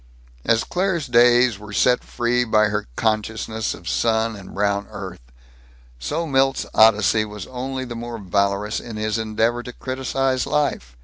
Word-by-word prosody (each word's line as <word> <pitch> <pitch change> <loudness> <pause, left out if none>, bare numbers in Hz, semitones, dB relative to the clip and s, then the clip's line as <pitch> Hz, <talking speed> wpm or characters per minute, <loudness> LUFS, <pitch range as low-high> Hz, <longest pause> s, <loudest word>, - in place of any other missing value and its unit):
As 115 -1 +2
Claire's 180 -4 -1
days 120 -2 +4
were 105 0 -10
set 125 +4 +3
free 120 +1 0
by 110 -2 +3
her 105 -6 -2
consciousness 110 0 -1
of 85 - -13
sun 110 +1 +1
and 100 -2 -11
brown 100 0 0
earth, 100 -3 -7 0.8
so 165 - -2
Milt's 135 -2 +1
odyssey 110 0 +5
was 105 -3 -7
only 130 +1 -5
the 120 -1 -7
more 120 0 -6
valorous 100 +1 0
in 115 -2 -8
his 110 +1 -1
endeavor 110 +2 0
to 125 - -8
criticize 130 0 -1
life. 140 - -1
115 Hz, 150 wpm, -22 LUFS, 105-125 Hz, 0.8 s, odyssey